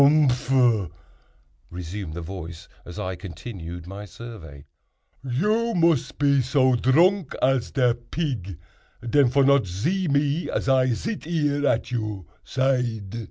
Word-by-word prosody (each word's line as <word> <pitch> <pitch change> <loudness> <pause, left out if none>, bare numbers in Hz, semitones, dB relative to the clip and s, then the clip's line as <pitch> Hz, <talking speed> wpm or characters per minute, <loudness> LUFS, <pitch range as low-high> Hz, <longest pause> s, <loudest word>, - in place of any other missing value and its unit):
"Humph!" 130 - +3 0.8
resumed 90 -1 -6
the 85 - -5
voice, 85 -1 -8 0.2
as 85 - -9
I 95 0 -3
continued 90 -1 -8
my 100 +3 -8
survey, 95 -12 -11 0.6
"you 210 - 0
mus 165 -6 +2
pe 140 -2 +2
so 130 +1 +3
dronk 165 +8 +3
as 130 -2 +1
de 125 -3 +2
pig, 120 - -4 0.5
den, 135 +2 +4
for 140 +2 +3
not 140 -5 +4
zee 165 - -1
me 145 +3 +1
as - - -2
I 130 -1 +4
zit 175 - -3
here 145 -3 0
at 115 - 0
your 110 -6 -3 0.2
zide." 125 -6 -1
125 Hz, 130 wpm, -24 LUFS, 95-145 Hz, 0.8 s, den